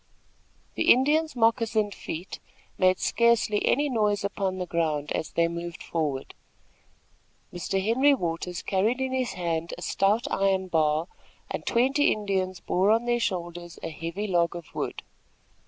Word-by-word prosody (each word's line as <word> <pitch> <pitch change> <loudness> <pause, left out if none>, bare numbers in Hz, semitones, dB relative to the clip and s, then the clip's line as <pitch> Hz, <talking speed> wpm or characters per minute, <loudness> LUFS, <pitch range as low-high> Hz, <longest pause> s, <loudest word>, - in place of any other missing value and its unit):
The - - +4
Indians' 300 +5 +3
moccasined 225 -3 +2
feet 170 +1 -7 0.4
made 185 0 +4
scarcely 235 -3 +2
any 290 +3 +3
noise 210 -6 +1
upon 195 -2 -2
the 180 - -3
ground, 155 -4 -1
as 155 - -3
they 170 0 +3
moved 170 0 -6
forward. 150 -5 -3 1.2
Mr. 180 +2 -2
Henry 255 +8 +4
Waters 175 -3 -3
carried 210 +6 +1
in 265 0 -1
his 255 -2 -1
hand 170 -2 -2
a - - -8
stout 210 +6 +1
iron 190 -1 +1
bar, 155 0 +1 0.4
and - - -5
twenty 270 +5 +3
Indians 190 -3 -1
bore 190 +3 +1
on 225 +2 +3
their 240 0 +1
shoulders 175 -4 -4
a 165 - -4
heavy 165 +6 -4
log 175 -4 +1
of 170 -2 -9
wood. - - -4
190 Hz, 145 wpm, -26 LUFS, 170-230 Hz, 1.2 s, The